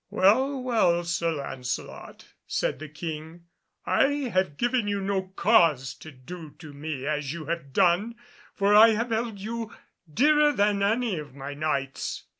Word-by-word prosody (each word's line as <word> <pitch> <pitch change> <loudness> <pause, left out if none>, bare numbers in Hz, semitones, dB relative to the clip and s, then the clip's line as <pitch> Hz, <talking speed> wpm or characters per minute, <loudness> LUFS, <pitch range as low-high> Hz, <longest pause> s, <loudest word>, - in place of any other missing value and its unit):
"Well, 260 +9 +3
well, 180 -9 +2
Sir 170 -1 -1
Lancelot," 135 -4 -6 0.2
said - - -1
the 155 0 -8
King, 160 +2 -7 0.4
"I 275 -2 +1
have 185 -6 0
given 240 -2 0
you 205 -1 -1
no 190 -1 -2
cause 165 - +3
to 155 - -12
do 155 +4 -11
to 155 -4 -11
me 145 -2 -5
as 150 -1 -2
you 170 -2 -7
have 165 -3 -4
done, 180 - +2 0.4
for 200 +1 +2
I 220 +1 +8
have 230 +2 -2
held 225 -1 -1
you 225 +2 -5 0.4
dearer 295 - +4
than 205 -2 +1
any 215 -2 +1
of 145 -3 -10
my 140 +1 -6
Knights." 140 -2 -3
180 Hz, 155 wpm, -26 LUFS, 150-225 Hz, 0.4 s, I